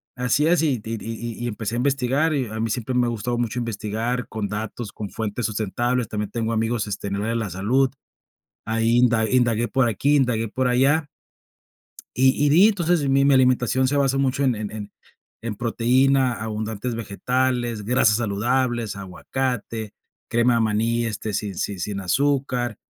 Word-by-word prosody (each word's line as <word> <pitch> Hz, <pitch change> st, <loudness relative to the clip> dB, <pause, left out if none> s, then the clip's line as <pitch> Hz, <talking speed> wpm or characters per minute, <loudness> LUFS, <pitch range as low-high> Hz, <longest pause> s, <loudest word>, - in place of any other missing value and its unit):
así 125 Hz, +4 st, +1 dB
es 175 Hz, 0 st, +3 dB
y 140 Hz, -6 st, +1 dB
di 110 Hz, +2 st, -5 dB
di -, -, -10 dB
y 115 Hz, +1 st, -5 dB
y -, -, -2 dB
y -, -, -1 dB
empecé 115 Hz, 0 st, -3 dB
a -, -, -1 dB
investigar, 135 Hz, +4 st, +1 dB
y 135 Hz, -4 st, -1 dB
a 110 Hz, +1 st, -6 dB
mí 115 Hz, 0 st, -1 dB
siempre 125 Hz, +2 st, -2 dB
me 125 Hz, -1 st, +3 dB
ha -, -, 0 dB
gustado 120 Hz, +1 st, -2 dB
mucho 120 Hz, 0 st, -1 dB
investigar 115 Hz, +1 st, -3 dB
con 110 Hz, -2 st, -3 dB
datos, 110 Hz, 0 st, -5 dB
con 105 Hz, -2 st, -6 dB
fuentes 110 Hz, +1 st, -3 dB
sustentables, 115 Hz, +3 st, -1 dB
también 105 Hz, -1 st, -3 dB
tengo 115 Hz, 0 st, -2 dB
amigos, 115 Hz, 0 st, 0 dB
este, 100 Hz, 0 st, -4 dB
en 100 Hz, -, -2 dB
el -, -, -2 dB
área 115 Hz, +2 st, -1 dB
de -, -, 0 dB
la 110 Hz, -3 st, -3 dB
salud, 125 Hz, +9 st, +1 dB, 0.7 s
ahí 115 Hz, +2 st, +2 dB
inda 115 Hz, -3 st, +3 dB
indagué 120 Hz, -2 st, +2 dB
por 130 Hz, +2 st, +2 dB
aquí, 135 Hz, +7 st, +1 dB
indagué 120 Hz, -5 st, +1 dB
por 130 Hz, +3 st, 0 dB
allá. 140 Hz, +5 st, +3 dB, 1.1 s
Y 130 Hz, +3 st, +3 dB
y -, -, +4 dB
di 180 Hz, +8 st, +6 dB
entonces 175 Hz, -7 st, +1 dB
mi 135 Hz, +1 st, +4 dB
mi 140 Hz, -, +5 dB
alimentación 130 Hz, 0 st, +3 dB
se 145 Hz, -, 0 dB
basa 135 Hz, -1 st, +2 dB
mucho 135 Hz, 0 st, +1 dB
en 130 Hz, -2 st, +3 dB
en 105 Hz, -1 st, -6 dB, 0.5 s
en 115 Hz, -2 st, -4 dB
proteína, 125 Hz, +3 st, +2 dB
abundantes 110 Hz, +1 st, -4 dB
vegetales, 120 Hz, +1 st, -1 dB
grasas 115 Hz, -1 st, +3 dB
saludables, 120 Hz, +1 st, 0 dB
aguacate, 110 Hz, +3 st, -4 dB, 0.3 s
crema 120 Hz, +1 st, +3 dB
de 115 Hz, -, +2 dB
maní, 115 Hz, +2 st, +1 dB
este, 110 Hz, -1 st, -4 dB
sin 100 Hz, 0 st, -3 dB
si 100 Hz, +2 st, -3 dB
sin 100 Hz, +3 st, -3 dB
azúcar, 125 Hz, +2 st, 0 dB
120 Hz, 185 wpm, -23 LUFS, 110-130 Hz, 1.1 s, di